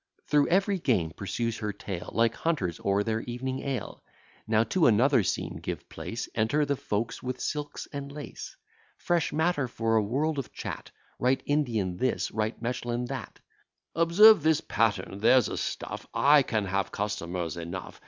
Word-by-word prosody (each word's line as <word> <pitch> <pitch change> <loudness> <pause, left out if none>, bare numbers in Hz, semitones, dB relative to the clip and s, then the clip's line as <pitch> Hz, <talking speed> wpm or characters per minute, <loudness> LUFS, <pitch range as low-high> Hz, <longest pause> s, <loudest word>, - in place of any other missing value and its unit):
Through 145 -1 +3
every 195 +2 +2
game 95 - +1
pursues 110 +6 -3
her 105 -1 -2
tale, 95 -3 -6
Like 115 +1 +2
hunters 100 - -1
o'er 100 +1 +2
their 110 +1 -1
evening 130 +3 -4
ale. 135 -2 -4 0.4
Now 110 0 +3
to 170 +7 +2
another 120 +3 +4
scene 95 - -2
give - - -5
place: 115 +1 -5
Enter 120 +7 +1
the 140 0 0
folks 115 -1 -3
with 125 0 -4
silks 145 -1 -4
and 140 0 -5
lace: 145 0 -8 0.4
Fresh 175 -2 0
matter 160 -3 +1
for 115 -1 0
a - - +4
world 140 +8 0
of 135 - -6
chat, - - -6 0.3
Right 130 +2 +2
Indian 115 -11 0
this, 130 +3 0
right 110 +1 -2
Mechlin 120 0 -3
that: - - -6 0.5
"Observe 170 +5 +7
this 155 0 +3
pattern 100 -1 0
there's 125 +4 +5
a - - -3
stuff; - - -4
I 145 +1 +6
can 110 -5 -1
have 95 0 -1
customers 90 -5 -3
enough. 85 +2 -7
120 Hz, 165 wpm, -28 LUFS, 105-145 Hz, 0.5 s, Observe